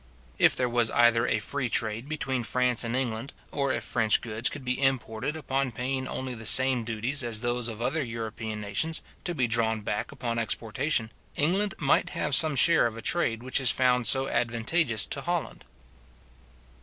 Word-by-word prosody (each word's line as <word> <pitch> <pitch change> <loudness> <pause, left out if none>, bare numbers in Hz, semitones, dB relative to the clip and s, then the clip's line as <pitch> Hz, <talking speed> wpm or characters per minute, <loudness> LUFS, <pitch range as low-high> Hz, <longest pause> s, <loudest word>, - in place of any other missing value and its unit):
If - - +4
there 125 - 0
was 120 -2 +1
either 120 0 +3
a - - +1
free 125 +3 -3
trade 115 +4 -3
between 135 -4 -3
France 125 +1 +1
and 115 +1 -3
England, 125 0 -3 0.2
or 140 -2 -1
if - - -3
French 110 -3 +2
goods 115 0 -1
could 145 -2 -9
be 125 +2 -2
imported 135 +1 -1
upon 135 -3 -2
paying 130 +3 -3
only 130 -1 -5
the 115 -2 -6
same 130 -1 +5
duties 115 +5 -2
as 115 -3 -1
those 120 -1 -1
of 115 0 -6
other 155 +5 -1
European 110 -2 -6
nations, 105 +11 -2 0.2
to 175 - -3
be 130 -4 +1
drawn 110 -1 -1
back 105 0 -4
upon 115 -2 -4
exportation, 115 +2 -1 0.2
England 195 +7 0
might 140 -3 +1
have 150 - -2
some 155 +1 +4
share 160 -1 +4
of 115 -1 -8
a - - -7
trade 115 -9 -1
which 130 +2 0
is 130 - +4
found 125 -2 +8
so 135 +5 +3
advantageous 120 +1 0
to - - -4
Holland. - - -4
125 Hz, 180 wpm, -26 LUFS, 115-135 Hz, 0.2 s, found